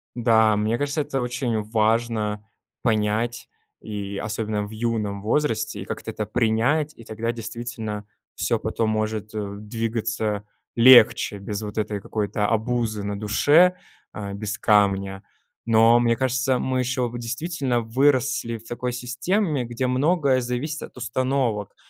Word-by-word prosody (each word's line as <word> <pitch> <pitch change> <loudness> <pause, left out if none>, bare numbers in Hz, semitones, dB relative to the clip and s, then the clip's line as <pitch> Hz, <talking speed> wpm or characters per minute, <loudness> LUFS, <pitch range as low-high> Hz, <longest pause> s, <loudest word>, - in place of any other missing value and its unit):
Да, 110 -2 +4
мне 105 +3 0
кажется, 145 +2 -1
это 135 -2 -2
очень 120 -2 -1
важно 110 -1 0 0.4
понять, 110 +1 0 0.3
и 100 -2 -5
особенно 105 0 -2
в 105 - -10
юном 110 -3 -2
возрасте 110 -3 0
и - - -6
как-то - - -6
это 105 -1 -3
принять, 120 +8 +1
и 115 - -12
тогда 110 +1 -3
действительно 115 -2 -6 0.3
всё - - 0
потом 115 -1 -1
может, 110 0 -2
э, 100 -1 -4
двигаться 110 -1 -2 0.3
легче 120 -3 +7
без 100 +1 -4
вот 105 0 -7
этой 105 -1 -1
какой-то 105 0 -1
обузы 110 -1 -1
на 100 0 -3
душе, 150 - +4 0.4
а, 100 -1 -5
без 100 0 -4
камня. 100 -2 +2 0.4
Но 115 +1 +5
мне 120 -1 +3
кажется, 130 0 +1
мы 130 -1 -1
еще 125 0 0
в 120 - -6
действительно 125 +1 -2
выросли 125 0 +1
в 115 +1 -16
такой 125 +1 -3
системе, 140 - -1
где 120 +2 -2
многое 140 +1 +2
зависит 125 +6 -3
от - - -11
установок, 125 -4 -1
115 Hz, 140 wpm, -24 LUFS, 105-125 Hz, 0.4 s, легче